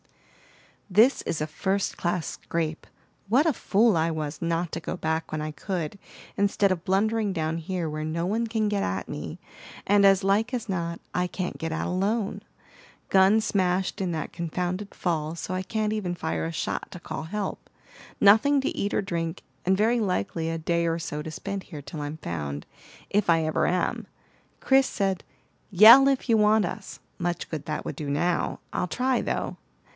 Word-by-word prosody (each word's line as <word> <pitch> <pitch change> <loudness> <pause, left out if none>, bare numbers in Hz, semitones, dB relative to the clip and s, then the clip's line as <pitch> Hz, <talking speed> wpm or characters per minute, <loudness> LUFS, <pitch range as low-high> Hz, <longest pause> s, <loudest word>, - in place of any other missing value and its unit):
"This 220 +8 +5
is 160 - -3
a 155 - -1
first 195 +5 -1
class 175 -1 -1
scrape. 165 -1 -3 0.4
What 260 +8 +4
a 320 - +3
fool 220 -2 +3
I 165 0 +2
was 155 -2 -4
not 170 0 -1
to - - -2
go - - -5
back 160 0 -2
when 155 - -2
I 155 0 -3
could, 170 +3 -4 0.4
instead 200 0 +2
of 180 -2 -1
blundering 210 +3 +1
down 160 -2 -1
here 175 0 -3
where 155 0 -4
no 165 +2 -2
one 225 +5 0
can 220 -1 0
get 205 -1 0
at 95 +1 -2
me, - - -6 0.5
and 205 0 +4
as 195 -1 +5
like 210 +6 +2
as 235 -2 -4
not 170 -3 -2
I 180 0 +1
can't 180 0 -4
get 165 0 -3
out 160 - -2
alone! 200 +3 -1 0.7
Gun 195 +3 +5
smashed 190 -3 0
in 185 -2 -1
that 160 - -4
confounded 180 +4 -3
fall, 160 -2 -2
so 175 - -5
I 185 - -1
can't 215 +2 -1
even 185 -5 -2
fire 80 - -2
a 80 - -3
shot - - -3
to - - -8
call - - -5
help. 200 +5 -4 0.5
Nothing 245 +8 +6
to 270 - -2
eat 200 - -1
or - - +1
drink, 165 -3 -3 0.2
and 190 +1 +3
very 230 +4 +3
likely 165 - -1
a 165 - -2
day 170 +1 0
or 165 0 0
so 150 -2 -4
to 155 - -6
spend 200 +4 -5
here 150 -5 -9
till 150 +2 -7
I'm 145 +2 -4
found, 75 - -5 0.4
if 205 -2 +1
I 165 -1 +4
ever 155 - +1
am. 180 0 -1 0.5
Chris 270 0 +4
said, 195 -2 -1 0.5
'Yell, 225 +8 +9
if 270 -1 0
you 230 - +4
want 210 -1 +4
us.' 195 +3 -7 0.2
Much 175 -1 -2
good 155 -2 -5
that 155 - -3
would - - -4
do 150 -2 -5
now! 170 +5 0
I'll - - 0
try, 250 +7 +1
though." - - -2
180 Hz, 190 wpm, -26 LUFS, 160-205 Hz, 0.7 s, Yell